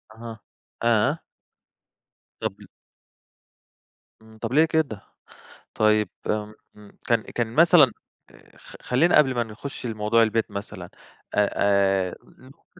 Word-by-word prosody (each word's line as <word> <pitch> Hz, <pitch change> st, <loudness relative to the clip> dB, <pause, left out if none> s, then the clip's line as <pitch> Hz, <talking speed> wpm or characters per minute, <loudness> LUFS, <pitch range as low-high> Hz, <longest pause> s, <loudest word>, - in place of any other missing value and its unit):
أها 115 Hz, -1 st, -9 dB, 0.4 s
آه. 120 Hz, +7 st, +2 dB, 1.2 s
طَب -, -, -4 dB
ل -, -, -14 dB, 1.5 s
إمم، 110 Hz, 0 st, -17 dB
طَب 115 Hz, +2 st, -5 dB
ليه 155 Hz, +3 st, +5 dB
كده؟ 155 Hz, -10 st, -1 dB, 0.7 s
طيب، 110 Hz, -1 st, +2 dB, 0.2 s
إمم 105 Hz, 0 st, -2 dB, 0.2 s
إمم، 105 Hz, -1 st, -17 dB
كان 115 Hz, -2 st, +2 dB
كان 115 Hz, 0 st, -4 dB
مثلًا 160 Hz, -5 st, +6 dB, 0.4 s
آآ، -, -, -21 dB
خ -, -, -13 dB
خلّينا 160 Hz, +8 st, +2 dB
قبل 135 Hz, -4 st, +3 dB
ما 120 Hz, -, 0 dB
نخُش 120 Hz, +4 st, -8 dB
لموضوع 110 Hz, +1 st, +1 dB
البيت 115 Hz, 0 st, 0 dB
مثلًا، 100 Hz, +1 st, -7 dB, 0.5 s
آآ 105 Hz, -1 st, +3 dB
آآ 95 Hz, -2 st, +2 dB
نقطة -, -, -20 dB
110 Hz, 120 wpm, -24 LUFS, 105-125 Hz, 1.5 s, مثلًا